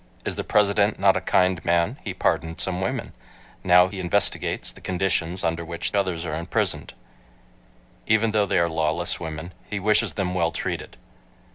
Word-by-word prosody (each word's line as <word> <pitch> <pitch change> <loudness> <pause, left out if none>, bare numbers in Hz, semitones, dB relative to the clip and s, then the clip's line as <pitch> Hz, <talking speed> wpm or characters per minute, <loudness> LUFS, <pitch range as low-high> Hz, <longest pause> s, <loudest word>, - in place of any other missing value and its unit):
"Is - - -2
the - - -3
President 105 0 +2
not 95 -1 +4
a - - 0
kind 90 -1 +2
man? 85 +9 +1
He 100 - -4
pardoned 85 -2 -1
some 90 0 0
women. 95 - -3 0.5
Now 90 -1 +6
he 95 0 -7
investigates 95 +3 0
the - - -16
conditions 90 -1 -1
under 85 +1 -1
which 85 0 -4
others 95 -4 0
are 75 - -4
imprisoned. 85 -5 0 1.1
Even 110 0 +3
though 105 -2 +2
they - - +1
are 85 -1 +3
lawless 80 +1 -1
women, 80 +2 -6 0.2
he 105 - -3
wishes 105 +2 +2
them 95 -3 -2
well 85 -2 +1
treated." - - -5
90 Hz, 165 wpm, -24 LUFS, 85-100 Hz, 1.1 s, Now